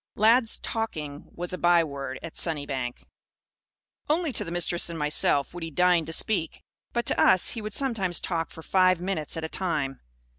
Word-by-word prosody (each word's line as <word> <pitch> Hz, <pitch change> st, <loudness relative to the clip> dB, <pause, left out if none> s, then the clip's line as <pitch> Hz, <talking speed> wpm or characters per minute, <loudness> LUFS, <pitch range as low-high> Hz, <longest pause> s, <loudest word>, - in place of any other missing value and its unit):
Lad's 225 Hz, +2 st, +4 dB
"talking" 155 Hz, -11 st, -4 dB
was 175 Hz, +1 st, -4 dB
a 180 Hz, -, -4 dB
byword, 145 Hz, -6 st, +1 dB
at -, -, -8 dB
Sunnybank. 140 Hz, -6 st, -2 dB, 1.1 s
Only 315 Hz, -2 st, +1 dB
to 210 Hz, -, -1 dB
the 175 Hz, -, -7 dB
Mistress 175 Hz, 0 st, 0 dB
and 165 Hz, -, -5 dB
myself 150 Hz, -1 st, +2 dB
would 175 Hz, -, -7 dB
he 165 Hz, -, -4 dB
deign 175 Hz, +1 st, +3 dB
to 165 Hz, -, -6 dB
"speak." 165 Hz, -1 st, 0 dB, 0.3 s
But, 235 Hz, 0 st, -1 dB
to -, -, +1 dB
us, 185 Hz, -1 st, +4 dB
he 230 Hz, -, -4 dB
would 215 Hz, 0 st, -5 dB
sometimes 215 Hz, -10 st, +1 dB
talk 165 Hz, -2 st, -2 dB
for 160 Hz, -, -12 dB
five 185 Hz, -1 st, +3 dB
minutes 175 Hz, -4 st, -3 dB
at 165 Hz, -, -4 dB
a -, -, -2 dB
time. 155 Hz, -7 st, -2 dB
175 Hz, 180 wpm, -26 LUFS, 155-195 Hz, 1.1 s, Lad's